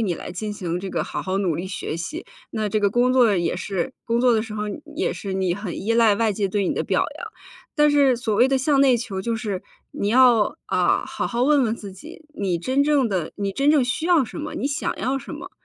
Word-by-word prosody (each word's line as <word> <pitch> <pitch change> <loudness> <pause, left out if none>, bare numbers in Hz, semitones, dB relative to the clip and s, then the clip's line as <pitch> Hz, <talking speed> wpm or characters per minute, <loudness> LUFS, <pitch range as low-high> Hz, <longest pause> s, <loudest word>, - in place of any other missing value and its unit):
你 195 -6 0
来 - - -8
进 210 +4 -4
行 180 -3 -3
这 190 0 -5
个 - - -1
好 - - -5
好 190 +1 -1
努 185 -5 0
力 175 +4 -4
学 185 -4 -4
习。 305 - -6 0.2
那 215 -2 -2
这 215 +1 0
个 200 -1 +2
工 245 +4 +2
作 235 -6 +4
也 170 -2 0
是， 190 +3 -3
工 235 0 0
作 250 -1 +4
的 220 - +1
时 220 -1 -8
候 210 0 -3 0.3
也 350 - 0
是， 195 - -6
你 190 -2 0
很 200 -3 -5
依 225 - 0
赖 230 -3 +4
外 225 -1 +1
界 200 0 -1
对 200 0 0
你 - - 0
的 - - -1
表 - - +1 0.2
扬。 455 - -6 0.5
但 295 -1 +5
是 280 -3 +4
所 230 -3 -2
谓 240 +5 +4
的 270 - +2
向 275 +1 +2
内 265 -3 +5
求 225 -5 -4
就 230 +4 -2
是， 205 -5 -4 0.3
你 200 - -2
要， 240 0 +4
啊， - - +1
好 - - -3
好 240 0 -1
问 285 +1 +4
问 225 -1 0
自 200 -4 -9
己， 310 - -12
你 195 - -1
真 260 +11 +1
正 285 -3 +3
的 185 -7 -2
你 200 -1 -2
真 275 +8 +2
正 295 -4 +4
需 260 +6 -2
要 340 -7 +4
什 220 - -9
么？ 305 0 -5
你 - - -2
想 280 0 -2
要 265 +2 -1
什 270 - -8
么？ 355 +5 -9
225 Hz, 275 characters per minute, -23 LUFS, 195-265 Hz, 0.5 s, 但